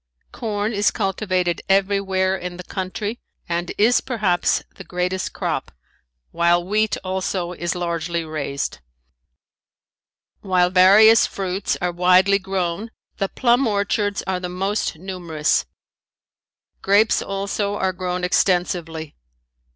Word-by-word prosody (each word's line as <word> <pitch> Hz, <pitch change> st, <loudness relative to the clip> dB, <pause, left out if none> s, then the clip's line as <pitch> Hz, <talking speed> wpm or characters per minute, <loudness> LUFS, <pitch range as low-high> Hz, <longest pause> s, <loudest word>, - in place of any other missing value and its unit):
Corn 215 Hz, -1 st, -2 dB
is 205 Hz, 0 st, +3 dB
cultivated 185 Hz, -3 st, -1 dB
everywhere 195 Hz, -1 st, +2 dB
in 180 Hz, -1 st, -6 dB
the 180 Hz, -, -7 dB
country 205 Hz, +5 st, -4 dB, 0.3 s
and 170 Hz, 0 st, -2 dB
is 230 Hz, +4 st, +4 dB
perhaps 210 Hz, -8 st, 0 dB
the -, -, -10 dB
greatest 180 Hz, +1 st, -2 dB
crop, -, -, -3 dB, 0.6 s
while 175 Hz, +1 st, +2 dB
wheat 215 Hz, +3 st, +1 dB
also 185 Hz, -1 st, -2 dB
is 175 Hz, -1 st, -3 dB
largely 170 Hz, -1 st, -2 dB
raised. 140 Hz, -, -4 dB, 1.6 s
While 180 Hz, -2 st, +2 dB
various 205 Hz, +5 st, +7 dB
fruits 190 Hz, 0 st, -2 dB
are 180 Hz, -, +1 dB
widely 185 Hz, +3 st, +4 dB
grown 190 Hz, +2 st, -3 dB, 0.3 s
the 195 Hz, -2 st, -1 dB
plum 245 Hz, +1 st, +2 dB
orchards 205 Hz, 0 st, 0 dB
are 190 Hz, -1 st, -1 dB
the 180 Hz, 0 st, -5 dB
most 190 Hz, 0 st, -2 dB
numerous. 170 Hz, -4 st, -1 dB, 1.1 s
Grapes 205 Hz, +3 st, +3 dB
also 200 Hz, +1 st, -2 dB
are 190 Hz, -2 st, 0 dB
grown 180 Hz, 0 st, -3 dB
extensively. 175 Hz, -4 st, 0 dB
185 Hz, 110 wpm, -21 LUFS, 175-200 Hz, 1.6 s, various